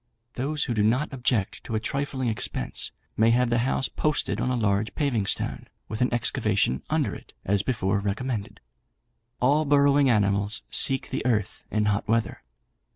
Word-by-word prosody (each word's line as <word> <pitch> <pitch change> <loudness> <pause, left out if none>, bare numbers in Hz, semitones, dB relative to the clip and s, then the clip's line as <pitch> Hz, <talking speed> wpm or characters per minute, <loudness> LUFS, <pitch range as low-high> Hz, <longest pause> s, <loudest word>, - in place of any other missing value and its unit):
Those 150 +4 -2
who 125 - -2
do 110 - +1
not 125 +8 +1
object 120 -6 -1
to 115 - -3
a - - +1
trifling 135 +1 -2
expense, 110 - -2 0.2
may 110 +1 +4
have 120 +1 +2
the 120 - +2
house 130 +2 0
posted 150 -1 -1
on - - 0
a 125 - 0
large 105 -2 0
paving 120 -9 0
stone, - - -1 0.2
with 110 +2 -5
an 125 - +2
excavation 110 - +1
under - - 0
it, - - -12
as 100 0 +3
before 100 -5 0
recommended. 105 +2 -3 0.8
All 145 +5 +3
burrowing 140 -1 +4
animals 100 -2 +1
seek 135 -1 +3
the - - -2
earth 110 -5 -1
in 105 0 0
hot 100 -1 0
weather. 115 +1 0
120 Hz, 165 wpm, -26 LUFS, 105-135 Hz, 0.8 s, may